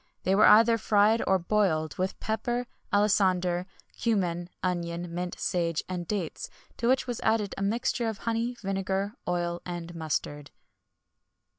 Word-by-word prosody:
[XXI - - -1
107] - - +5
They - - +5
were 210 +1 +8
either 230 0 +3
fried 215 +1 +3
or 190 - +4
boiled, 170 -4 +1
with 185 +1 -2
pepper, 240 +3 -2 0.3
alisander, 185 -3 +2 0.4
cummin, 180 -6 0
onion, 175 -1 -2
mint, 175 +1 -4
sage, 170 -3 0
and 180 -2 -4
dates, 195 -7 -3 0.3
to 235 - -1
which 260 +2 +3
was 245 -2 -4
added 220 -3 +1
a - - -6
mixture 230 +3 0
of 220 - -5
honey, 230 +2 -2
vinegar, 195 +1 -1
oil, 175 -1 -1
and 175 -1 -6
mustard. 145 -2 -3
190 Hz, 150 wpm, -28 LUFS, 175-215 Hz, 0.4 s, were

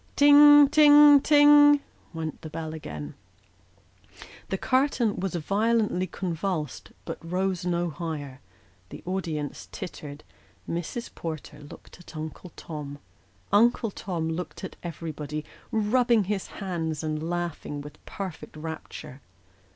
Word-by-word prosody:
Ting, 290 0 +8
ting, 295 -1 +7
ting! 290 0 +7 0.3
went 160 -2 -6
the 160 - -8
bell 160 0 -6
again. 75 - -7 1.4
The 190 - -1
curtain 255 -3 +1
was 185 -2 -3
violently 205 +2 0
convulsed, 170 -5 -4
but - - -6
rose 180 +1 -2
no 175 -1 0
higher; 145 -4 -6 0.5
the - - -10
audience 165 -6 -4
tittered; 150 -4 -8 0.4
Mrs. 175 +8 -5
Porter 155 -2 -7
looked 145 +4 -14
at 175 -2 -12
Uncle 155 +3 -7
Tom; 150 -3 -7 0.6
Uncle 225 +1 +3
Tom 175 -5 -4
looked 175 +4 -5
at 190 - -6
everybody, 155 -3 -6 0.3
rubbing 230 +1 +2
his 195 0 -3
hands, 165 -6 -4
and 155 -1 -2
laughing 175 -4 -4
with 150 +1 -12
perfect 190 -5 -7
rapture. 155 -3 -8
175 Hz, 115 wpm, -26 LUFS, 155-215 Hz, 1.4 s, Ting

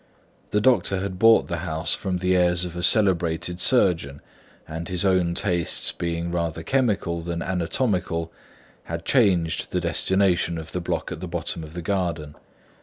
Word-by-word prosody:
The 105 - +1
doctor 115 -5 +2
had 95 -1 -4
bought 115 +1 +5
the 85 - -3
house 80 -1 -1
from 95 -3 -2
the 90 +1 +1
heirs 90 0 +2
of 85 -1 -7
a 90 - -4
celebrated 90 -3 +2
surgeon; 85 - +2 0.5
and 80 +2 -6
his 90 +1 0
own 90 -3 +2
tastes 85 -2 0
being 85 0 -3
rather 85 -2 -2
chemical 100 -8 0
than 85 0 -4
anatomical, 90 -2 -1 0.5
had 85 0 -5
changed 95 -10 +2
the - - -1
destination 95 -3 +1
of 80 0 -8
the 90 - -3
block 85 - -3
at - - -5
the - - -6
bottom 80 - -4
of 80 0 -10
the 85 -1 -6
garden. 85 -6 -2
90 Hz, 165 wpm, -24 LUFS, 85-95 Hz, 0.5 s, bought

